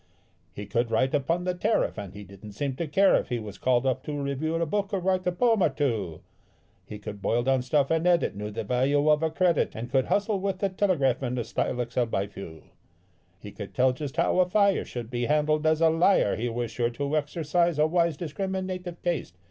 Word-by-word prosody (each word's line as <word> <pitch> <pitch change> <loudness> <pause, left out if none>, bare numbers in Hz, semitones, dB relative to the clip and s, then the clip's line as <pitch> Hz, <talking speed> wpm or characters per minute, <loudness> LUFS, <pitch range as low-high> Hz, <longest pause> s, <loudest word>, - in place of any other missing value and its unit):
He 105 +4 -7
could 115 +3 -1
write 130 +4 +1
upon 165 +5 0
the 180 0 -1
tariff, 210 +5 0
and 100 -1 -8
he 105 - -8
didn't 100 +2 -12
seem 135 +5 -3
to 170 - -2
care 190 +6 +4
if - - +1
he 120 - -1
was 105 -3 -8
called 125 0 +2
off 130 -2 0
to 145 -1 -5
review 140 +3 -2
a 165 0 +1
book 200 +5 -2
or 195 - 0
write 185 0 0
a - - +3
poem 225 +3 +2
or 175 - +4
two: 115 - -2 0.7
He 105 - -7
could 105 -1 -8
boil 120 +4 +1
down 135 0 +2
stuff 135 +3 +1
and 165 +2 +2
edit, 175 - +2
knew 105 +1 -5
the 110 +2 -4
value 135 +6 +1
of 150 0 +3
a 160 - +1
credit, 170 0 +1
and 120 +3 -6
could 130 -1 +2
hustle 205 0 0
with 195 0 -2
the 200 +1 0
telegraph 180 -10 +1
in 125 -1 -2
a 120 - -1
style 120 +2 -2
excelled 120 0 -1
by 95 -2 0
few. 95 -5 -10 0.7
He 105 +1 -10
could 100 -2 -9
tell 130 0 +3
just 145 +3 -6
how 170 +2 +2
a 180 0 +3
fire 200 0 +3
should 120 -1 -7
be 120 -1 -1
handled; 155 +2 +1
as 155 0 +2
a 165 -1 +5
liar 165 - +3
he 120 +2 -2
was 120 0 -3
sure 120 +1 0
to 140 +5 -3
exercise 160 +2 0
a 150 - +4
wise, 170 -1 +1
discriminative 185 +1 -4
taste. 165 - -2
145 Hz, 230 wpm, -27 LUFS, 120-175 Hz, 0.7 s, a